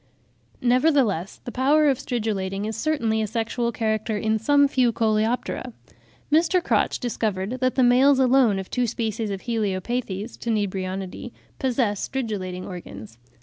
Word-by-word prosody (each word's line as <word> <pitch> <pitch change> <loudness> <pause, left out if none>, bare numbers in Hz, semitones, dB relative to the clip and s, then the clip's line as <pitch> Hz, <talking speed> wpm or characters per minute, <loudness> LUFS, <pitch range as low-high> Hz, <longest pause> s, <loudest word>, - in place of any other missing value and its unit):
Nevertheless, 245 - +2
the 245 - -5
power 290 +5 +3
of 270 -3 +2
stridulating 205 -5 -2
is 220 0 -3
certainly 230 -6 0
a 215 - -1
sexual 235 +2 -1
character 220 -1 -1
in 220 +1 0
some 285 +5 +4
few 255 -3 +2
Coleoptera. 225 +2 -1 0.6
Mr. 335 +3 +3
Crotch - - +1
discovered 220 -1 -2
that 255 0 +1
the 260 - +3
males 260 +3 +5
alone 255 -5 +4
of 190 -1 -6
two 250 -1 0
species 220 -1 -2
of 195 -1 -4
Heliopathes 220 0 -3
(Tenebrionidae) 195 -1 -3 0.3
possess 240 -6 0
stridulating 195 -8 -4
organs. 115 - -9
225 Hz, 135 wpm, -24 LUFS, 200-255 Hz, 0.6 s, males